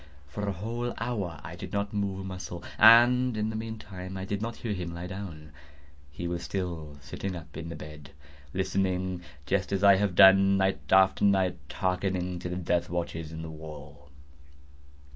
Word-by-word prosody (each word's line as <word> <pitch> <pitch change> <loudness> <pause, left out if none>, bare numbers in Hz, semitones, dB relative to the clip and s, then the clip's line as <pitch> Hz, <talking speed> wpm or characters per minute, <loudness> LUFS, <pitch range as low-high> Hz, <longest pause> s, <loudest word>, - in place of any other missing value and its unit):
For 105 +9 -4
a - - +1
whole 115 +6 -4
hour 100 -10 -3
I 80 +2 -7
did 95 +1 -8
not 100 +1 -1
move 100 -2 -1
a - - -5
muscle, 90 -2 -6 0.2
and 120 +2 +7
in 105 +1 0
the - - -6
meantime 95 -4 -6
I 95 - -4
did 100 +1 -3
not 115 +1 -3
hear 115 -3 -3
him 85 -3 -5
lie 85 +1 -5
down. 90 -6 -7 0.6
He 85 +5 -5
was 85 0 -3
still 85 -6 -4
sitting 95 +7 -5
up 80 -3 -10
in 80 0 -6
the 85 - -6
bed 75 -1 -10 0.4
listening;—just 95 -2 -2
as 100 0 0
I 100 -1 +8
have 100 -2 0
done, 95 +1 +7
night 95 0 0
after 95 0 +5
night, 95 -3 +3
hearkening 90 0 -1
to 90 - -5
the 90 - -3
death 90 -1 0
watches 85 -2 -3
in 80 0 -6
the 80 - -6
wall. 75 -2 -11
95 Hz, 180 wpm, -28 LUFS, 85-100 Hz, 0.6 s, I